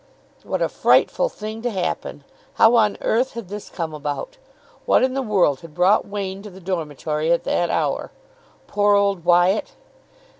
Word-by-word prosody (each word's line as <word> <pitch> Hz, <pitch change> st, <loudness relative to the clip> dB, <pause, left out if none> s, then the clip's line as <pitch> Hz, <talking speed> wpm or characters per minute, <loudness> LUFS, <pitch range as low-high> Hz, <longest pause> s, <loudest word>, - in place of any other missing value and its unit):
What -, -, -2 dB
a -, -, +2 dB
frightful -, -, +2 dB
thing 215 Hz, -, -7 dB
to 245 Hz, -, -1 dB
happen! 190 Hz, -5 st, -4 dB, 0.3 s
How 225 Hz, +1 st, +5 dB
on 215 Hz, -3 st, +3 dB
earth 245 Hz, +4 st, +1 dB
had 230 Hz, -6 st, -8 dB
this 205 Hz, 0 st, -7 dB
come 165 Hz, -3 st, -5 dB
about? 150 Hz, -, -5 dB, 0.5 s
What -, -, +4 dB
in 260 Hz, 0 st, +1 dB
the 270 Hz, -, -1 dB
world 190 Hz, -, +2 dB
had 165 Hz, -2 st, -13 dB
brought 185 Hz, +4 st, +3 dB
Wain 195 Hz, -1 st, -5 dB
to 210 Hz, -, -9 dB
the 190 Hz, 0 st, -13 dB
dormitory 160 Hz, -3 st, -2 dB
at 170 Hz, -, +2 dB
that 175 Hz, -, 0 dB
hour? -, -, -1 dB, 0.6 s
Poor 205 Hz, 0 st, +2 dB
old 200 Hz, -3 st, +1 dB
Wyatt! 175 Hz, +4 st, +3 dB
195 Hz, 165 wpm, -21 LUFS, 170-215 Hz, 0.6 s, How